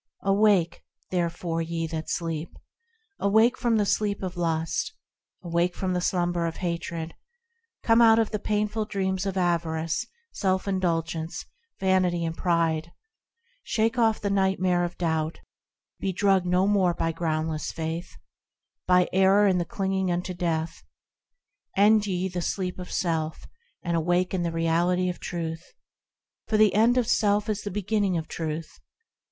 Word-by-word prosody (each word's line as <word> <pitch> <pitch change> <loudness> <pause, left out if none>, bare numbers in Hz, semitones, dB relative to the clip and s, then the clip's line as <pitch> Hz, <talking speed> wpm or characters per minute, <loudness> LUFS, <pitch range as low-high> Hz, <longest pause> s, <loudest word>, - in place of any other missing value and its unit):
Awake! 195 -4 +3 0.3
therefore, 170 -1 -1
ye 165 0 -2
that 160 0 -5
sleep! 165 -1 -3 0.6
Awake 220 +5 +4
from 235 -3 +1
the 210 - +2
sleep 200 0 0
of 185 -1 -4
lust! 165 -2 -1 0.5
Awake 170 +1 0
from 185 -1 -2
the 180 - 0
slumber 175 -2 0
of 165 - -5
hatred! 170 -2 -4 0.7
Come 230 +1 +5
out 225 -1 +7
of 225 -1 +1
the 210 - -2
painful 210 +1 -1
dreams 190 -1 -2
of 195 -1 -3
avarice, 165 -2 0 0.2
self 190 0 -1
indulgence, 165 -3 -2 0.3
vanity 185 -3 +2
and 165 0 -3
pride! 165 -2 0 0.7
Shake 225 +2 0
off 225 -2 +3
the 200 - -2
nightmare 190 -2 +2
of 175 0 -4
doubt! 160 -2 -1 0.6
Be 195 - -1
drugged 190 -1 +2
no 180 +1 +3
more 190 -4 +2
by 165 - 0
groundless 160 -1 -2
faith, 165 +2 -5 0.7
By 180 0 +4
error, 195 +2 +5
and 185 -3 +3
the - - -2
clinging 190 +1 -1
unto 180 +1 -2
death! 165 -2 -2 1.0
End 210 +1 +5
ye 185 -1 -1
the 180 -1 -4
sleep 180 +1 -3
of 180 - -8
self, 160 -3 -2 0.4
and 170 -1 -1
awake 175 +3 +1
in 185 - 0
the 170 -1 -1
Reality 170 +2 +1
of 180 - -5
Truth! 165 -1 -5 0.7
For 215 - +1
the 215 -2 +5
end 230 +4 +4
of 250 - +3
self 210 -3 +2
is 210 -1 -1
the 205 - -4
beginning 205 -1 0
of 160 -1 -4
Truth. 160 -1 -5
180 Hz, 150 wpm, -26 LUFS, 165-200 Hz, 1.0 s, out